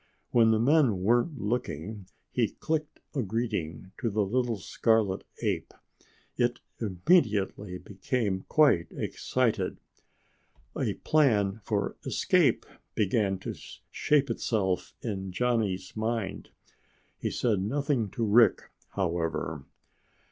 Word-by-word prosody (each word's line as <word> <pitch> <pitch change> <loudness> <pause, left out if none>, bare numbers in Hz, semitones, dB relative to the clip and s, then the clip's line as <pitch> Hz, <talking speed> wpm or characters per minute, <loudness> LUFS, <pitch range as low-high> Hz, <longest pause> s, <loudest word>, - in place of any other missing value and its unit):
When 115 -2 +5
the 110 - +4
men 125 - +3
weren't 120 - +2
looking, 105 -3 -3 0.2
he - - +2
clicked 155 -1 -3
a 140 - 0
greeting 100 -6 -3
to 115 - 0
the 105 -1 +1
little 120 +2 0
scarlet 105 0 +1 0.2
ape. - - -2 0.6
It 120 0 +1 0.2
immediately 105 - +1
became 100 0 -2
quite 140 - +4
excited. 115 -7 -1 1.0
A - - -1
plan 110 -9 +2
for - - -1
escape - - +2 0.3
began 100 -1 +1
to - - -4 0.4
shape 140 -4 +2
itself 100 -5 -1
in 95 -4 -3
Johnny's 110 -4 -1
mind. 110 -2 -2 0.7
He - - -1
said 110 -5 +1
nothing 130 0 0
to 115 +4 -2
Rick, 110 +1 +4 0.2
however. 80 -5 -2
110 Hz, 105 wpm, -28 LUFS, 95-120 Hz, 1.0 s, When